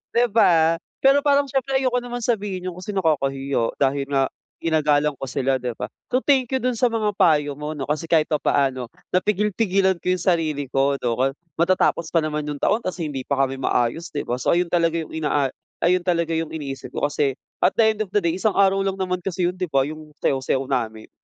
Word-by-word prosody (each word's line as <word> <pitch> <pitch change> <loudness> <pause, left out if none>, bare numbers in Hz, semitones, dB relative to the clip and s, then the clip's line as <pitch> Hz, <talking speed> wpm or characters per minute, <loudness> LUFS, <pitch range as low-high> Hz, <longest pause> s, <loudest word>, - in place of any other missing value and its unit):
di 240 +1 +5
ba. 165 -6 +4 0.2
Pero 275 +1 +6
parang 285 -1 +4
syempre 270 0 -1
ayoko 255 -2 +1
naman 245 0 -6
sabihin 200 -5 -2
yon - - -12
kasi 185 +3 -5
nakakahiya, 135 -7 0
dahil 140 0 +1
nga 135 -1 +1 0.3
ginagalang 150 -2 +2
ko - - -3
sila 130 +1 0
di 125 -1 -3
ba. 125 - -4 0.2
So 255 +1 +1
thank 265 -3 +3
you 265 - +1
dun 250 -1 +1
sa 250 - +4
mga 225 -3 0
payo 150 -3 +4
mo 150 +1 -4
'no, 140 - -4
kasi 150 +2 -2
kahit 160 -1 +2
papaano 135 -4 +1 0.2
napigil-pigilan 195 -1 +1
ko - - -9
yung 180 -2 -3
sarili 155 -6 0
ko 140 +1 +2
'no. 125 +3 +1 0.3
Matatapos 170 -1 +2
pa 170 - +3
naman 150 -1 -2
yung 145 -1 -4
taon 215 - +3
tapos 185 0 -4
hindi 140 -4 -4
pa 140 -1 0
kami 135 0 -2
maayos 125 +6 0
'di 145 - -3
ba. 120 +1 -2
So 130 - +2
ayon 175 0 0
talaga 170 -1 +2
yung - - -13
inaa 145 -3 0 0.3
ayon 180 +1 +3
talaga 170 -2 0
yung 160 -1 -1
iniisip 140 -4 -6
ko - - +1
kasi 140 -2 0 0.3
at - - +4
the 225 - +5
end 215 - -15
of 210 - -3
the 205 - +3
day 170 -2 0
isang 195 +3 0
araw 195 0 +4
lang 195 0 -1
naman 185 -1 -1
kasi 180 -1 -1
yun - - -5
di 185 - -1
ba, 135 -2 +3
yung 155 0 -9
sayaw-sayaw 135 0 0
namin. 110 -5 -2
165 Hz, 215 wpm, -22 LUFS, 140-195 Hz, 0.3 s, Pero